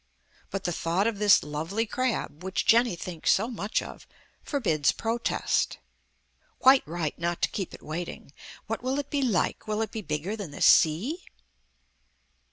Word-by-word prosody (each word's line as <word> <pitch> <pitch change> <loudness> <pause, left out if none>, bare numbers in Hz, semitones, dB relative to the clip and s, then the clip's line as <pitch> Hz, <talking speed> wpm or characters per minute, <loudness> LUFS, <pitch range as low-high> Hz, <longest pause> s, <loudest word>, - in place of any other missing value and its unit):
But 195 0 -4
the 175 - -1
thought 170 +4 0
of 225 -3 -1
this 205 -1 +6
lovely 160 +9 -2
crab, 225 - -2
which 190 0 -2
Jenny 235 -3 +4
thinks 170 -1 -1
so 215 +4 +2
much 220 -3 -2
of, - - -11 0.3
forbids 185 - +1
protest. 230 +1 -1 0.8
Quite 265 +1 +6
right 160 -2 -3
not 170 0 -1
to - - +3
keep 190 -4 -4
it - - -16
waiting. 160 -2 -6 0.3
What 225 +1 -3
will 260 +2 -1
it 285 -1 -4
be 285 - 0
like? 230 -6 0
Will 215 +1 0
it 220 - -6
be 220 - -4
bigger 155 +4 -3
than 200 -6 -6
the 145 - -10
sea? 220 - +4
200 Hz, 165 wpm, -27 LUFS, 170-230 Hz, 0.8 s, this